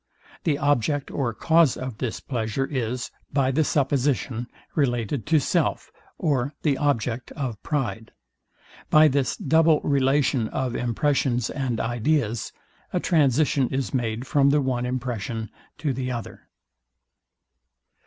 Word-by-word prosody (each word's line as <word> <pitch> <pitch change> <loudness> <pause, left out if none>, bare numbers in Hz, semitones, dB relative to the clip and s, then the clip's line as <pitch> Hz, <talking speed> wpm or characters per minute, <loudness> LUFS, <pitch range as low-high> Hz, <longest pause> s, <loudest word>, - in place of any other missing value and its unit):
The 150 -4 +2
object 145 0 +1
or 130 -4 -1
cause 160 +4 +3
of 130 -3 -6
this 125 -4 -3
pleasure 120 +1 -2
is, 125 -3 -3 0.2
by 135 -2 +2
the 155 +4 +2
supposition, 135 -4 0 0.3
related 120 -3 0
to 160 0 +4
self, 140 - 0 0.3
or 140 -2 0
the 145 -3 +3
object 125 -4 -1
of 130 -8 -4
pride. 130 -7 -3 0.8
By 155 0 +7
this 135 -3 0
double 160 +1 +4
relation 135 -3 +2
of 125 0 -2
impressions 125 -1 0
and 130 -5 -2
ideas, 120 -1 0 0.4
a - - 0
transition 145 -4 +2
is 135 0 -2
made 120 -1 -1
from 140 +1 +3
the 145 +1 +4
one 125 -3 -1
impression 120 -3 -3 0.3
to 145 -4 -1
the 130 0 -3
other. 120 -2 -7
130 Hz, 125 wpm, -25 LUFS, 120-145 Hz, 0.8 s, By